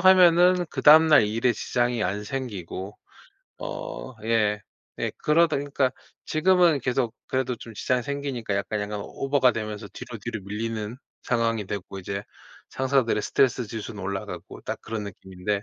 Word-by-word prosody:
하면은 180 Hz, -1 st, +6 dB
그다음 155 Hz, +2 st, +7 dB
날 150 Hz, -8 st, +7 dB
일에 115 Hz, +3 st, +2 dB
지장이 120 Hz, +1 st, 0 dB
안 100 Hz, +3 st, -1 dB
생기고 105 Hz, -6 st, -5 dB, 0.6 s
어 -, -, -6 dB
예. 105 Hz, -2 st, +2 dB, 0.4 s
예. -, -, -1 dB
그러다 155 Hz, 0 st, +3 dB
그러니까 140 Hz, -2 st, 0 dB, 0.3 s
지금은 170 Hz, -2 st, +4 dB
계속 125 Hz, -2 st, 0 dB
그래도 130 Hz, -2 st, 0 dB
좀 115 Hz, -, -10 dB
지장이 125 Hz, +3 st, 0 dB
생기니까 135 Hz, -7 st, -3 dB
약간, 105 Hz, +1 st, -2 dB
약간 105 Hz, 0 st, -3 dB
오버가 135 Hz, -3 st, +2 dB
되면서 105 Hz, -1 st, -5 dB
뒤로, 115 Hz, -3 st, -8 dB
뒤로 110 Hz, 0 st, -5 dB
밀리는 110 Hz, +2 st, -4 dB, 0.3 s
상황이 115 Hz, -3 st, 0 dB
됐고 95 Hz, -1 st, -5 dB
이제 100 Hz, +2 st, -4 dB, 0.5 s
상사들의 130 Hz, -5 st, +1 dB
스트레스 125 Hz, -4 st, +2 dB
지수는 110 Hz, -3 st, -6 dB
올라가고 95 Hz, 0 st, -5 dB
딱 -, -, -4 dB
그런 110 Hz, -2 st, -4 dB
느낌인데 95 Hz, +1 st, -4 dB
115 Hz, 340 characters per minute, -26 LUFS, 105-140 Hz, 0.6 s, 그다음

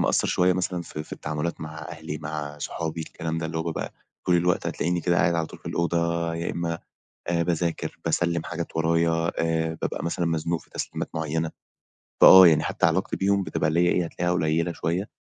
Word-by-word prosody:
مقصِّر -, -, +2 dB
شوية 90 Hz, +1 st, +3 dB
مثلًا 90 Hz, -1 st, -2 dB
في 75 Hz, -2 st, -6 dB
في -, -, -14 dB
التعاملات 75 Hz, +2 st, -3 dB
مع 80 Hz, 0 st, -7 dB
أهلي، 75 Hz, -, -6 dB
مع 75 Hz, -1 st, -5 dB
صُحابي، 80 Hz, +2 st, -4 dB
الكلام 80 Hz, 0 st, -4 dB
ده. 80 Hz, -, -2 dB
اللي 80 Hz, 0 st, -3 dB
هو 80 Hz, -, -1 dB
بابقى 85 Hz, -1 st, -4 dB, 0.3 s
طول 90 Hz, -1 st, +4 dB
الوقت، 90 Hz, +1 st, +1 dB
هتلاقِيني 85 Hz, +1 st, -1 dB
كده 85 Hz, +1 st, +1 dB
قاعِد 85 Hz, -, +3 dB
على 85 Hz, -1 st, 0 dB
طول -, -, -12 dB
في -, -, -16 dB
الأوضة، 85 Hz, -1 st, 0 dB
يا 85 Hz, +1 st, -2 dB
إمَّا 85 Hz, -1 st, -2 dB, 0.5 s
باذاكر، 85 Hz, 0 st, -1 dB
باسلِّم 85 Hz, -1 st, +1 dB
حاجات 85 Hz, 0 st, -5 dB
ورايا، 85 Hz, +1 st, +2 dB
آآ، 80 Hz, 0 st, 0 dB
بابقى -, -, -2 dB
مثلًا 85 Hz, +1 st, -1 dB
مزنوق 85 Hz, 0 st, -1 dB
في -, -, -22 dB
تسليمات -, -, -4 dB
معيَّنة. 80 Hz, +1 st, -1 dB, 0.7 s
فآه 95 Hz, -1 st, +11 dB
يعني 80 Hz, -2 st, +4 dB
حتى -, -, 0 dB
علاقتي 90 Hz, +4 st, +1 dB
بيهُم 100 Hz, 0 st, +2 dB
بتبقى 75 Hz, -, -1 dB
اللي 80 Hz, +2 st, +1 dB
هي 90 Hz, -, +4 dB
إيه، 90 Hz, -, +1 dB
هتلاقِيها 90 Hz, +1 st, -1 dB
قليلة 85 Hz, 0 st, +1 dB
شوية. 85 Hz, +5 st, -2 dB
85 Hz, 195 wpm, -25 LUFS, 80-85 Hz, 0.7 s, فآه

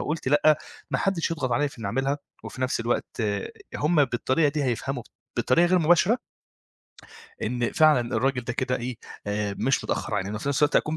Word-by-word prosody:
وقُلت 150 Hz, -3 st, -2 dB
لأ، 150 Hz, +1 st, +5 dB, 0.3 s
ما -, -, +1 dB
حدّش 190 Hz, -4 st, 0 dB
يضغط 135 Hz, -7 st, -1 dB
عليَّ 145 Hz, +5 st, +2 dB
في 135 Hz, -, -15 dB
إنّي 115 Hz, -, -4 dB
أعملها 135 Hz, +7 st, 0 dB, 0.3 s
وفي 130 Hz, -, -8 dB
نفس 130 Hz, -2 st, 0 dB
الوقت 120 Hz, 0 st, -2 dB, 0.5 s
هم 150 Hz, 0 st, +3 dB
بالطريقة 130 Hz, +4 st, +1 dB
دي 145 Hz, -1 st, -1 dB
هيفهموا 125 Hz, +1 st, -2 dB, 0.3 s
بطريقة 170 Hz, +7 st, +4 dB
غير 185 Hz, +1 st, +3 dB
مباشرة 175 Hz, +8 st, +4 dB, 1.2 s
إن 120 Hz, -1 st, -1 dB
فعلًا 150 Hz, -7 st, +4 dB
الراجل 130 Hz, -2 st, 0 dB
ده 125 Hz, -, -2 dB
كده 125 Hz, +1 st, -1 dB
إيه، 120 Hz, 0 st, -5 dB, 0.3 s
آآ 105 Hz, 0 st, -1 dB
مش 135 Hz, +5 st, +1 dB
متأخّر -, -, -2 dB
عنّنا. 100 Hz, +1 st, -2 dB
وفي 125 Hz, +6 st, -3 dB
نفس 140 Hz, +1 st, 0 dB
الوقت 145 Hz, -, +4 dB
أكون 155 Hz, +1 st, +1 dB
135 Hz, 180 wpm, -26 LUFS, 120-155 Hz, 1.2 s, لأ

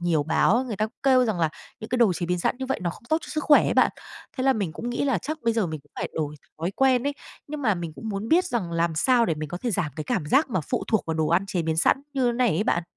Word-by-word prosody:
nhiều 170 Hz, -4 st, +1 dB
báo, 215 Hz, -, +2 dB
người 225 Hz, -5 st, -5 dB
ta 215 Hz, -, 0 dB, 0.2 s
kêu 260 Hz, -2 st, +5 dB
rằng 215 Hz, -6 st, -1 dB
là 160 Hz, -, +2 dB, 0.3 s
những 220 Hz, -, -7 dB
cái 250 Hz, -, +1 dB
đồ 220 Hz, -6 st, +5 dB
chế 170 Hz, 0 st, -3 dB
biến 180 Hz, 0 st, 0 dB
sẵn 210 Hz, -, 0 dB
như 265 Hz, -, -4 dB
vậy 265 Hz, -, -2 dB
nó 170 Hz, -, 0 dB
không 210 Hz, -, -13 dB
tốt 315 Hz, -, +3 dB
cho -, -, -11 dB
sức 305 Hz, -1 st, -3 dB
khỏe 290 Hz, -, +6 dB
ấy -, -, 0 dB
bạn. -, -, +5 dB, 0.5 s
Thế 260 Hz, -, -1 dB
là 270 Hz, -, +5 dB
mình 200 Hz, -8 st, -2 dB
cũng 235 Hz, +8 st, -5 dB
nghĩ 245 Hz, -, -1 dB
là 270 Hz, -, +1 dB
chắc 310 Hz, +2 st, -5 dB
bây 230 Hz, 0 st, +2 dB
giờ 220 Hz, -5 st, +1 dB
mình 155 Hz, -2 st, -5 dB
cũng 145 Hz, -, -31 dB
phải -, -, -3 dB
đổi 150 Hz, -1 st, -2 dB, 0.2 s
thói 170 Hz, +4 st, -1 dB
quen 260 Hz, -2 st, +3 dB
ấy. 285 Hz, -, +1 dB, 0.3 s
Nhưng 295 Hz, -1 st, -6 dB
mà 215 Hz, -5 st, +3 dB
mình 170 Hz, -3 st, -5 dB
cũng 225 Hz, -, -7 dB
muốn 205 Hz, +2 st, -4 dB
biết 355 Hz, +3 st, +4 dB
rằng 205 Hz, -9 st, -2 dB
làm 170 Hz, 0 st, 0 dB
sao 240 Hz, +7 st, +3 dB
để 165 Hz, -, +1 dB
mình 155 Hz, 0 st, -5 dB
có 175 Hz, -, -5 dB
thể 240 Hz, +4 st, -2 dB
giảm 170 Hz, -6 st, -1 dB
cái 155 Hz, -, -4 dB
cảm 190 Hz, -12 st, -1 dB
giác 275 Hz, -, +3 dB
mà 185 Hz, -7 st, 0 dB
phụ -, -, -3 dB
thuộc 220 Hz, -6 st, +1 dB
vào 160 Hz, -, -1 dB
đồ 155 Hz, -1 st, +1 dB
ăn 180 Hz, +4 st, +2 dB
chế 180 Hz, -3 st, -1 dB
biến 160 Hz, 0 st, -1 dB
sẵn 265 Hz, +11 st, +3 dB
như 250 Hz, -3 st, +1 dB
này 245 Hz, 0 st, +2 dB
ấy 195 Hz, +3 st, 0 dB
bạn? 170 Hz, -5 st, +1 dB
210 Hz, 320 wpm, -25 LUFS, 170-255 Hz, 0.5 s, khỏe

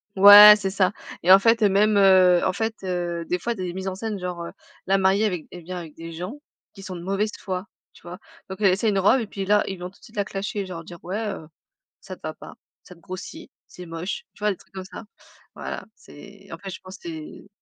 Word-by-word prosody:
Ouais, 205 Hz, +2 st, +11 dB
c'est 195 Hz, -2 st, -3 dB
ça. 195 Hz, 0 st, +1 dB, 0.3 s
Et 180 Hz, -, +4 dB
en 190 Hz, -, +11 dB
fait, 225 Hz, +3 st, +3 dB
même, 210 Hz, +1 st, +3 dB
heu, 185 Hz, -2 st, +5 dB
en -, -, +2 dB
fait, 220 Hz, +2 st, -2 dB
heu, 175 Hz, -2 st, -3 dB
des 180 Hz, -, -1 dB
fois, 235 Hz, +7 st, -3 dB
des 185 Hz, -4 st, -5 dB
mises 190 Hz, +1 st, -5 dB
en 190 Hz, -, -2 dB
scène 215 Hz, 0 st, -4 dB
genre, 180 Hz, -1 st, -5 dB
heu, -, -, -8 dB, 0.4 s
la 195 Hz, +1 st, +3 dB
mariée 195 Hz, +2 st, +2 dB
avec 180 Hz, -6 st, -2 dB
elle 175 Hz, -2 st, -10 dB
vient 180 Hz, +2 st, -6 dB
avec 165 Hz, -3 st, -9 dB
des 165 Hz, 0 st, -9 dB
gens 180 Hz, +6 st, -6 dB, 0.4 s
qui 195 Hz, -, -13 dB
sont 190 Hz, -1 st, -7 dB
de 170 Hz, -, -8 dB
mauvaise 195 Hz, +3 st, -1 dB
foi, 185 Hz, 0 st, -5 dB, 0.3 s
tu -, -, -19 dB
vois? 175 Hz, +1 st, -9 dB, 0.3 s
Donc 190 Hz, -, -7 dB
elle 195 Hz, -3 st, +5 dB
essaye 210 Hz, +4 st, 0 dB
une 200 Hz, -, 0 dB
robe 205 Hz, +7 st, +4 dB
et 225 Hz, -, -5 dB
puis 195 Hz, -1 st, -5 dB
là, 210 Hz, +1 st, +3 dB
ils 190 Hz, -, -5 dB
vont 180 Hz, -, -6 dB
tout 195 Hz, -, -24 dB
de -, -, -27 dB
suite -, -, -16 dB
la 205 Hz, -, -1 dB
clasher 200 Hz, +1 st, -4 dB
genre 170 Hz, -3 st, -8 dB
dire: 170 Hz, +1 st, -11 dB
«Ouais, 190 Hz, +5 st, -4 dB
heu, 200 Hz, -7 st, -5 dB, 0.6 s
ça 190 Hz, -, -8 dB
te -, -, -23 dB
va 155 Hz, 0 st, -5 dB
pas, -, -, -12 dB, 0.3 s
ça 180 Hz, -, -14 dB
te 170 Hz, -, -22 dB
grossit, 190 Hz, -, -9 dB, 0.2 s
c'est 180 Hz, -, -11 dB
moche». 165 Hz, +3 st, -5 dB
Tu -, -, -21 dB
vois, 210 Hz, -, +1 dB
des 195 Hz, -, -3 dB
trucs -, -, -24 dB
comme 190 Hz, -1 st, -6 dB
ça. 190 Hz, +4 st, -10 dB, 0.5 s
Voilà, -, -, -6 dB
c'est 200 Hz, +5 st, -15 dB
en 165 Hz, -, -7 dB
fait, 195 Hz, +2 st, -8 dB
je -, -, -9 dB
pense 185 Hz, 0 st, -11 dB
c'est 160 Hz, +3 st, -9 dB
190 Hz, 255 wpm, -23 LUFS, 180-205 Hz, 0.6 s, Ouais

